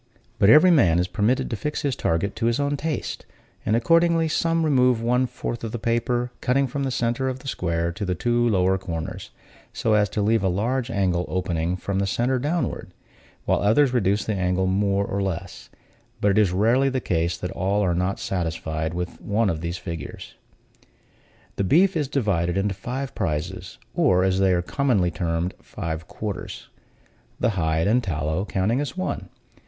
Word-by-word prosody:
But 100 Hz, -2 st, +5 dB
every 155 Hz, +8 st, +8 dB
man 95 Hz, -, +4 dB
is 90 Hz, +1 st, +1 dB
permitted 105 Hz, +7 st, +1 dB
to -, -, 0 dB
fix 150 Hz, +8 st, -3 dB
his 140 Hz, -4 st, 0 dB
target 90 Hz, +5 st, -1 dB
to 115 Hz, 0 st, 0 dB
his 120 Hz, +3 st, +1 dB
own 145 Hz, 0 st, 0 dB
taste; 155 Hz, +1 st, -3 dB, 0.4 s
and 110 Hz, -, +1 dB
accordingly, 165 Hz, +6 st, +3 dB
some 165 Hz, +1 st, +1 dB
remove 125 Hz, -5 st, +3 dB
one 125 Hz, +2 st, +1 dB
fourth 120 Hz, -1 st, -5 dB
of 115 Hz, -, -3 dB
the -, -, -1 dB
paper, 120 Hz, +2 st, 0 dB
cutting 135 Hz, +2 st, +2 dB
from 140 Hz, +2 st, -3 dB
the 135 Hz, -, 0 dB
center 120 Hz, +1 st, 0 dB
of 130 Hz, -, -4 dB
the 130 Hz, -, -12 dB
square 85 Hz, -8 st, -1 dB
to 95 Hz, +4 st, -6 dB
the 90 Hz, -2 st, -1 dB
two 120 Hz, +4 st, +1 dB
lower 95 Hz, -2 st, +2 dB
corners, 85 Hz, -4 st, -5 dB, 0.4 s
so 110 Hz, -, 0 dB
as 105 Hz, -1 st, +3 dB
to 105 Hz, -, -1 dB
leave 110 Hz, +1 st, +2 dB
a 95 Hz, -, +1 dB
large 120 Hz, +7 st, -1 dB
angle 90 Hz, -5 st, 0 dB
opening 90 Hz, -2 st, -1 dB
from 95 Hz, +1 st, -3 dB
the 100 Hz, -, 0 dB
center 125 Hz, +6 st, 0 dB
downward; 150 Hz, +1 st, -2 dB, 0.5 s
while -, -, +2 dB
others 125 Hz, +6 st, +3 dB
reduce 105 Hz, -3 st, +1 dB
the 110 Hz, -, -1 dB
angle 90 Hz, -1 st, 0 dB
more 100 Hz, +1 st, +1 dB
or 100 Hz, 0 st, -2 dB
less: 95 Hz, -1 st, -5 dB, 0.5 s
but 100 Hz, -, +3 dB
it 100 Hz, -, +3 dB
is 100 Hz, -4 st, +3 dB
rarely 115 Hz, +8 st, +3 dB
the 130 Hz, -1 st, -1 dB
case 85 Hz, -6 st, -1 dB
that 90 Hz, -, -5 dB
all 100 Hz, +2 st, 0 dB
are 90 Hz, -3 st, +1 dB
not 90 Hz, +3 st, -1 dB
satisfied 80 Hz, -2 st, -3 dB
with 90 Hz, 0 st, -5 dB
one 105 Hz, 0 st, +1 dB
of 80 Hz, -1 st, -4 dB
these 85 Hz, +1 st, -3 dB
figures. 85 Hz, -3 st, -7 dB, 1.2 s
The -, -, +1 dB
beef 175 Hz, -, +4 dB
is 150 Hz, -4 st, 0 dB
divided 100 Hz, -, 0 dB
into 100 Hz, +1 st, 0 dB
five 125 Hz, +7 st, -5 dB
prizes, 90 Hz, 0 st, -3 dB, 0.2 s
or, 90 Hz, 0 st, +3 dB
as 95 Hz, 0 st, +1 dB
they 95 Hz, -1 st, +3 dB
are 85 Hz, -1 st, +1 dB
commonly 105 Hz, -6 st, +1 dB
termed, 85 Hz, +1 st, -2 dB
five 80 Hz, 0 st, -5 dB
quarters 105 Hz, -3 st, -6 dB, 0.7 s
the 120 Hz, -, +2 dB
hide 80 Hz, -4 st, 0 dB
and 120 Hz, +5 st, +3 dB
tallow 80 Hz, -1 st, -1 dB
counting 105 Hz, +7 st, 0 dB
as 145 Hz, +5 st, -5 dB
one. 185 Hz, -, -3 dB
100 Hz, 185 wpm, -24 LUFS, 90-125 Hz, 1.2 s, every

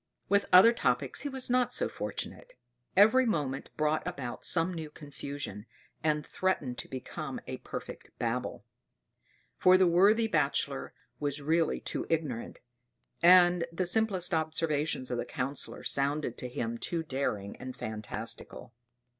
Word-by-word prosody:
With 200 Hz, +1 st, +3 dB
other 200 Hz, +6 st, +9 dB
topics -, -, 0 dB
he 290 Hz, -, -3 dB
was 265 Hz, -2 st, -3 dB
not 250 Hz, 0 st, +2 dB
so -, -, +1 dB
fortunate; -, -, -6 dB, 0.4 s
every 220 Hz, +6 st, +7 dB
moment 145 Hz, -10 st, -1 dB
brought 155 Hz, 0 st, +1 dB
about 140 Hz, -9 st, -5 dB
some 175 Hz, +1 st, +1 dB
new 160 Hz, -3 st, -5 dB
confusion, 145 Hz, -, -7 dB, 0.4 s
and 150 Hz, -1 st, +1 dB
threatened 145 Hz, -10 st, -1 dB
to -, -, -5 dB
become 130 Hz, -1 st, -6 dB
a -, -, -5 dB
perfect -, -, -7 dB
Babel; -, -, -3 dB, 0.9 s
for 185 Hz, 0 st, +7 dB
the 185 Hz, -, +5 dB
worthy 200 Hz, +6 st, +5 dB
Bachelor 145 Hz, -6 st, 0 dB, 0.2 s
was 145 Hz, -1 st, -1 dB
really 160 Hz, +3 st, +1 dB
too -, -, -4 dB
ignorant, 150 Hz, -8 st, -2 dB, 0.6 s
and 175 Hz, -1 st, +6 dB
the 180 Hz, +2 st, -1 dB
simplest 185 Hz, -2 st, +1 dB
observations 155 Hz, -4 st, 0 dB
of 120 Hz, -, -1 dB
the -, -, -1 dB
Councillor 135 Hz, +3 st, -3 dB
sounded 140 Hz, -2 st, 0 dB
to 125 Hz, -, -4 dB
him 115 Hz, -1 st, -3 dB
too 170 Hz, -2 st, -2 dB
daring 130 Hz, -9 st, -2 dB
and 130 Hz, 0 st, -8 dB
phantastical. 110 Hz, +1 st, -6 dB
155 Hz, 140 wpm, -30 LUFS, 135-185 Hz, 0.9 s, other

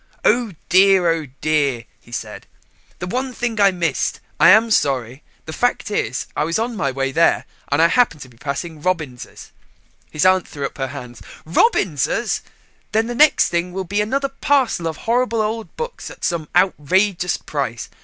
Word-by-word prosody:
"Oh 230 Hz, -2 st, +2 dB
dear, 190 Hz, 0 st, +5 dB
oh 160 Hz, -3 st, -2 dB
dear," 145 Hz, -6 st, +1 dB, 0.2 s
he 120 Hz, -, -20 dB
said, 110 Hz, -3 st, -6 dB, 0.5 s
"the 180 Hz, -, -5 dB
one 255 Hz, +7 st, -3 dB
thing 235 Hz, -3 st, -2 dB
I 200 Hz, -, +7 dB
missed. 175 Hz, -3 st, -1 dB, 0.2 s
I 170 Hz, -, +7 dB
am 220 Hz, +4 st, +6 dB
sorry. 130 Hz, -, 0 dB, 0.2 s
The 160 Hz, -, -7 dB
fact 245 Hz, -1 st, -1 dB
is 125 Hz, -, -1 dB
I -, -, +1 dB
was 165 Hz, +2 st, 0 dB
on 230 Hz, +1 st, -2 dB
my 145 Hz, -9 st, -1 dB
way 135 Hz, 0 st, -2 dB
there 165 Hz, +5 st, +2 dB, 0.3 s
and 145 Hz, -, +2 dB
I -, -, +7 dB
happened 170 Hz, -5 st, +2 dB
to -, -, -13 dB
be 120 Hz, -2 st, -20 dB
passing 150 Hz, +4 st, -5 dB
Robins's." 155 Hz, -8 st, -4 dB, 0.6 s
His 150 Hz, +4 st, -1 dB
aunt 185 Hz, -1 st, +4 dB
threw 140 Hz, -1 st, -5 dB
up -, -, -7 dB
her 135 Hz, -, -1 dB
hands. 120 Hz, -4 st, -9 dB, 0.2 s
"Robins's! 185 Hz, -, +1 dB, 0.5 s
Then 220 Hz, +1 st, +2 dB
the 240 Hz, -, -4 dB
next 300 Hz, +4 st, +4 dB
thing 175 Hz, +1 st, -2 dB
will 190 Hz, 0 st, -3 dB
be 200 Hz, +4 st, -1 dB
another 275 Hz, +6 st, -1 dB
parcel 265 Hz, -10 st, +1 dB
of 160 Hz, -2 st, -4 dB
horrible 235 Hz, 0 st, +1 dB
old 220 Hz, +1 st, -3 dB
books 475 Hz, +1 st, -5 dB
at -, -, -13 dB
some 165 Hz, -3 st, -1 dB
outrageous 180 Hz, +1 st, +2 dB
price. 125 Hz, -7 st, -4 dB
180 Hz, 175 wpm, -20 LUFS, 145-220 Hz, 0.6 s, I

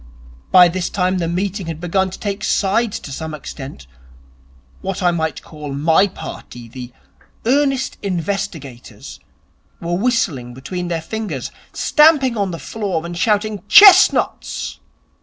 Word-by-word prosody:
By 180 Hz, -1 st, +8 dB
this 180 Hz, +1 st, -2 dB
time 185 Hz, -1 st, 0 dB
the 170 Hz, -, -1 dB
meeting 185 Hz, +2 st, -3 dB
had 160 Hz, -2 st, -5 dB
begun 190 Hz, +2 st, 0 dB
to 185 Hz, -, -9 dB
take 205 Hz, 0 st, -4 dB
sides 210 Hz, +2 st, 0 dB
to 140 Hz, -, -9 dB
some 160 Hz, +2 st, -5 dB
extent. 135 Hz, -, -9 dB, 1.0 s
What 195 Hz, 0 st, -4 dB
I 175 Hz, -, +4 dB
might 160 Hz, -4 st, -3 dB
call 150 Hz, -3 st, -8 dB
my 160 Hz, +7 st, +3 dB
party, 120 Hz, -9 st, -9 dB
the 125 Hz, +1 st, -9 dB, 0.5 s
Earnest 270 Hz, +1 st, +1 dB
Investigators, 180 Hz, -, -5 dB, 0.6 s
were 170 Hz, +1 st, -4 dB
whistling 175 Hz, -, -1 dB
between 175 Hz, +7 st, -5 dB
their 165 Hz, -2 st, -3 dB
fingers, 195 Hz, -, -5 dB, 0.2 s
stamping 300 Hz, -5 st, +4 dB
on 200 Hz, -3 st, -1 dB
the 170 Hz, -, -5 dB
floor, 190 Hz, -5 st, -4 dB
and 170 Hz, 0 st, -6 dB
shouting, 210 Hz, +1 st, 0 dB
"Chestnuts!" 385 Hz, -, +5 dB
180 Hz, 135 wpm, -18 LUFS, 160-210 Hz, 1.0 s, By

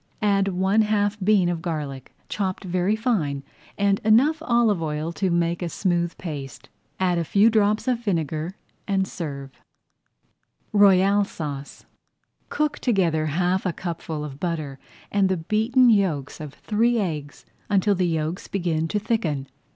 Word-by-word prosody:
Add 200 Hz, -1 st, +3 dB
one 190 Hz, +3 st, +2 dB
half 210 Hz, -1 st, +1 dB
bean 200 Hz, -3 st, +4 dB
of 175 Hz, -2 st, -2 dB
garlic, 150 Hz, -6 st, -5 dB, 0.2 s
chopped 190 Hz, -1 st, -3 dB
very 185 Hz, +3 st, 0 dB
fine, 175 Hz, -, -1 dB, 0.3 s
and 200 Hz, -1 st, +2 dB
enough 265 Hz, +9 st, +4 dB
olive 235 Hz, -, +2 dB
oil 155 Hz, +1 st, -2 dB
to 185 Hz, +4 st, -1 dB
make 170 Hz, 0 st, 0 dB
a 175 Hz, -, -2 dB
smooth 175 Hz, 0 st, -1 dB
paste. 145 Hz, -7 st, -7 dB, 0.3 s
Add 180 Hz, -2 st, +2 dB
a -, -, 0 dB
few 205 Hz, +7 st, +4 dB
drops 215 Hz, +1 st, +2 dB
of 250 Hz, -2 st, +1 dB
vinegar 165 Hz, -5 st, -2 dB, 0.3 s
and 195 Hz, -2 st, +1 dB
serve. 140 Hz, -7 st, -6 dB
[Page -, -, -31 dB, 1.1 s
36] -, -, -43 dB
ROYALE 200 Hz, 0 st, +5 dB
SAUCE 145 Hz, -6 st, -7 dB, 0.6 s
Cook 300 Hz, 0 st, -1 dB
together 170 Hz, -9 st, +1 dB
half 180 Hz, +5 st, 0 dB
a 185 Hz, -, 0 dB
cupful 160 Hz, -4 st, -5 dB
of 140 Hz, -2 st, -9 dB
butter 155 Hz, -6 st, -3 dB, 0.3 s
and 200 Hz, -2 st, +2 dB
the 190 Hz, -, +1 dB
beaten 225 Hz, +8 st, +3 dB
yolks 170 Hz, -10 st, 0 dB
of 145 Hz, -2 st, -8 dB
three 230 Hz, +3 st, +1 dB
eggs 155 Hz, -8 st, -4 dB, 0.2 s
until 205 Hz, 0 st, +3 dB
the 180 Hz, -2 st, +1 dB
yolks 160 Hz, +1 st, -2 dB
begin 165 Hz, -4 st, -1 dB
to 210 Hz, -, -1 dB
thicken. 205 Hz, -, -1 dB
185 Hz, 150 wpm, -24 LUFS, 160-205 Hz, 1.1 s, ROYALE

